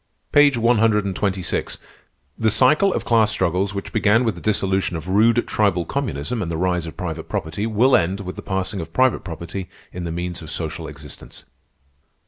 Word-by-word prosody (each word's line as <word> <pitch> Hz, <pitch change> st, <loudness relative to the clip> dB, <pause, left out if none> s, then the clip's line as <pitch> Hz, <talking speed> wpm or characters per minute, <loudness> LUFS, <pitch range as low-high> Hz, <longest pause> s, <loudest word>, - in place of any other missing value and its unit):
"Page 145 Hz, -3 st, +5 dB
one 115 Hz, 0 st, +3 dB
hundred 105 Hz, -2 st, +3 dB
and 95 Hz, -2 st, -3 dB
twenty 95 Hz, -1 st, -1 dB
six: -, -, -3 dB, 0.6 s
'The 110 Hz, -, +1 dB
cycle 155 Hz, -, +4 dB
of -, -, -2 dB
class 110 Hz, -2 st, +4 dB
struggles 95 Hz, -1 st, 0 dB
which 100 Hz, -, -6 dB
began 110 Hz, +3 st, +3 dB
with 115 Hz, -3 st, +1 dB
the 85 Hz, -, -11 dB
dissolution 95 Hz, -4 st, 0 dB
of 80 Hz, +2 st, -8 dB
rude, 115 Hz, +5 st, +3 dB
tribal 95 Hz, -5 st, +1 dB
communism 110 Hz, -, -3 dB
and 85 Hz, -4 st, -3 dB
the 80 Hz, -, -2 dB
rise 90 Hz, -1 st, 0 dB
of 80 Hz, -, -9 dB
private 80 Hz, -3 st, -5 dB
property 100 Hz, +1 st, -3 dB
will 115 Hz, +5 st, +4 dB
end 95 Hz, +2 st, +1 dB
with 90 Hz, -1 st, -6 dB
the -, -, -7 dB
passing 95 Hz, 0 st, -3 dB
of 80 Hz, 0 st, -9 dB
private 130 Hz, -1 st, +3 dB
property 85 Hz, +2 st, -6 dB, 0.2 s
in 90 Hz, -, -5 dB
the 85 Hz, -, -4 dB
means 90 Hz, +1 st, -4 dB
of 80 Hz, -, -9 dB
social 80 Hz, 0 st, -4 dB
existence. 75 Hz, -1 st, -11 dB
95 Hz, 195 wpm, -21 LUFS, 85-110 Hz, 0.6 s, Page